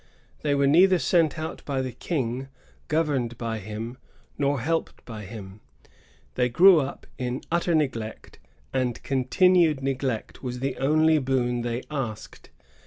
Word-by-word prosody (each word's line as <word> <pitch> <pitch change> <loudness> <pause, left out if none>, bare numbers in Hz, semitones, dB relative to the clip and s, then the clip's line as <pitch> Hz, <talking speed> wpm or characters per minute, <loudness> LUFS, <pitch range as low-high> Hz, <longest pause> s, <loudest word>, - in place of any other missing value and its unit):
They 145 -2 +1
were 140 0 +3
neither 180 +6 +6
sent 165 -3 +2
out 160 0 -5
by 135 -2 -2
the 130 - -4
King, 130 -1 -3 0.4
governed 140 -7 0
by 115 -2 -3
him, 110 +5 -6 0.4
nor 140 -1 0
helped 165 +5 -2
by 110 -3 -8
him. 100 -1 -10 0.7
They 125 -1 +1
grew 175 +7 +7
up 135 -1 -4
in 125 0 -3
utter 170 0 +2
neglect, 120 -8 -3 0.3
and 130 -3 -1
continued 155 +3 +3
neglect 130 -4 -2
was 125 -2 -4
the 135 +1 -2
only 155 +3 +3
boon 125 -3 0
they 120 +1 -3
asked. 110 -7 -5
135 Hz, 140 wpm, -26 LUFS, 120-155 Hz, 0.7 s, grew